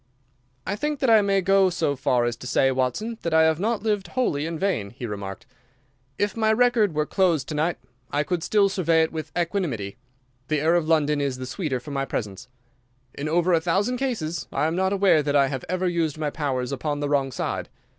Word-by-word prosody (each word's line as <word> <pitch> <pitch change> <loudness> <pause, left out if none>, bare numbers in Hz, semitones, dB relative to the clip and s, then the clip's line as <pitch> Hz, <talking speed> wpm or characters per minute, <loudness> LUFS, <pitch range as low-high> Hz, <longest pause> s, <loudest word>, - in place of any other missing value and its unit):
"I - - -2
think 295 +7 -2
that 265 -5 +3
I 220 -1 +7
may 195 -1 +2
go 195 0 +4
so 160 -5 -1
far 125 -3 +1
as 120 0 -1
to 125 - -8
say, 135 +1 +3
Watson, 170 - -2
that 170 -1 -1
I 160 - +6
have 160 0 +2
not 220 +1 -1
lived 210 -3 0
wholly 160 - -1
in 165 0 -4
vain," 180 - -1
he 120 +4 -8
remarked. 100 -3 -6 0.7
"If 205 -1 -1
my 220 -1 +2
record 225 -6 +3
were 150 0 +1
closed 170 -7 +1
to - - -3
night 155 +3 0 0.3
I 145 +1 0
could 175 +1 -2
still 200 +3 +3
survey 170 -4 +2
it 160 - -2
with 155 -2 -6
equanimity. 165 - -2 0.5
The 155 0 0
air 160 +3 +2
of 170 -3 +1
London 150 -2 +2
is 135 -2 -1
the 130 - -5
sweeter 140 -3 -3
for 145 +4 -10
my 135 -1 -1
presence. 105 -4 -5 0.7
In 145 +2 -4
over 175 +2 +2
a 165 - +3
thousand 195 +9 0
cases 175 - -3
I 145 - 0
am 160 +1 0
not 190 +1 +1
aware 195 -5 +4
that 145 0 -1
I 140 -1 +4
have 130 -1 -4
ever 185 +1 0
used 165 -4 -1
my 150 -2 -2
powers 135 -5 -2
upon 145 +2 -2
the 145 - -1
wrong 140 -2 +1
side. - - -3
160 Hz, 220 wpm, -24 LUFS, 140-195 Hz, 0.7 s, I